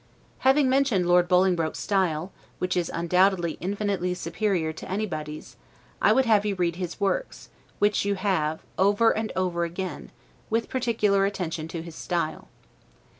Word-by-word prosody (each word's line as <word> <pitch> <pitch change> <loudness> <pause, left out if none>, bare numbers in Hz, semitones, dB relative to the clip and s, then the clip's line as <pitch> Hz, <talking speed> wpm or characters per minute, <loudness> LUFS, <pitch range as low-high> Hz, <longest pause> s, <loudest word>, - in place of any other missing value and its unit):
Having 270 +1 +4
mentioned 260 -8 +2
Lord 175 0 +4
Bolingbroke's 180 -3 +2
style, 185 -3 0 0.3
which 180 +1 -1
is, 175 -2 0
undoubtedly, 175 0 +1
infinitely 195 -1 -1
superior 170 -2 -1
to 160 - -9
anybody's, 155 - -4 0.4
I 210 - +5
would 260 +4 +4
have 215 -3 +4
you 205 -2 -1
read 175 -2 -1
his 180 0 -5
works, 205 - -2 0.3
which 205 0 +2
you 200 0 0
have, 160 -6 0 0.2
over 205 +4 +4
and 220 0 -2
over 180 -2 0
again, 180 +2 -5 0.4
with 225 +1 0
particular 215 -6 +2
attention 170 -5 -4
to 165 0 -6
his 170 -1 -9
style. 170 -1 -3
185 Hz, 145 wpm, -26 LUFS, 170-205 Hz, 0.4 s, I